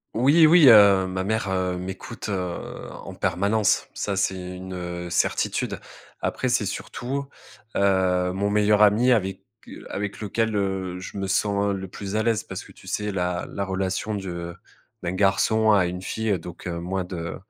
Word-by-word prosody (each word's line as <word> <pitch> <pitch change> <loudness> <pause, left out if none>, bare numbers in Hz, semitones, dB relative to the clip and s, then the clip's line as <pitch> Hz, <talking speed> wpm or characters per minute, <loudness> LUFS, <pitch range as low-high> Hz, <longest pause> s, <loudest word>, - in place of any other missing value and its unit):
Oui, 145 +8 +6
oui. 160 -2 +7
Heu, 100 -4 +7
ma 95 0 -3
mère, 110 -1 -1
heu, 95 -1 0
m'écoute, 95 +5 -6
heu, 90 -3 -2 0.3
en - - -9
permanence. 100 +4 +1
Ça, 100 - -2
c'est 95 -1 0 0.2
une, 95 0 -7
heu, 90 -1 -5
certitude. 85 - 0 0.4
Après, - - -1
c'est - - +1
surtout, 135 +3 -4 0.5
heu, 95 -2 +2
mon 100 +2 -1
meilleur 105 0 +4
ami 110 +5 +5
avec 95 -5 +1 0.5
avec 100 0 -4
lequel, 110 +1 -1
heu, 95 -2 -2
je 95 - -8
me 95 - -2
sens 100 +1 +1
le 95 0 -5
plus 100 +2 -6
à 110 - +2
l'aise 115 -1 +1
parce - - -7
que, - - -15
tu - - -18
sais, 105 0 -2
la 90 -2 -2
la 100 - -3
relation 95 +2 -2
de 85 -4 -5 0.5
d'un 90 0 -3
garçon 105 +3 +3
à 95 -4 +4
une 90 +1 -5
fille, 110 -1 -1
donc, 85 +2 -9
moins 90 +2 -3
de, 85 -3 -5
95 Hz, 170 wpm, -24 LUFS, 90-105 Hz, 0.5 s, oui